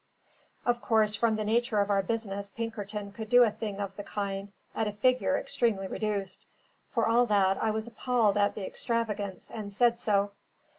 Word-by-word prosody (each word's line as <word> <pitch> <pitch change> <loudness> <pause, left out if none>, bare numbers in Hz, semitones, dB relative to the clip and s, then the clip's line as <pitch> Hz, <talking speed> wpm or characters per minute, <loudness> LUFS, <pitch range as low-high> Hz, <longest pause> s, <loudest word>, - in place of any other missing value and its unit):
Of 240 0 +1
course, 215 -2 +3
from 220 +1 +2
the 215 - -2
nature 230 0 +1
of 200 0 +1
our 195 -1 +3
business, 200 -1 -3
Pinkerton 210 -2 -5
could 220 +1 -7
do 245 +1 +8
a 225 - +3
thing 210 -2 -5
of 195 -1 -4
the 205 - -6
kind 200 -1 -4 0.2
at 220 - 0
a 210 - -3
figure 255 +5 +2
extremely 210 -5 0
reduced; 200 -2 -3 0.5
for 230 -3 +1
all 240 +2 +4
that, 195 -2 +3
I 220 - +2
was 220 0 -2
appalled 235 -2 +1
at 205 0 +2
the 205 - -4
extravagance, 210 -5 -3
and 210 -2 -6
said 235 +3 +3
so. 205 -3 +1
215 Hz, 185 wpm, -29 LUFS, 200-230 Hz, 0.5 s, do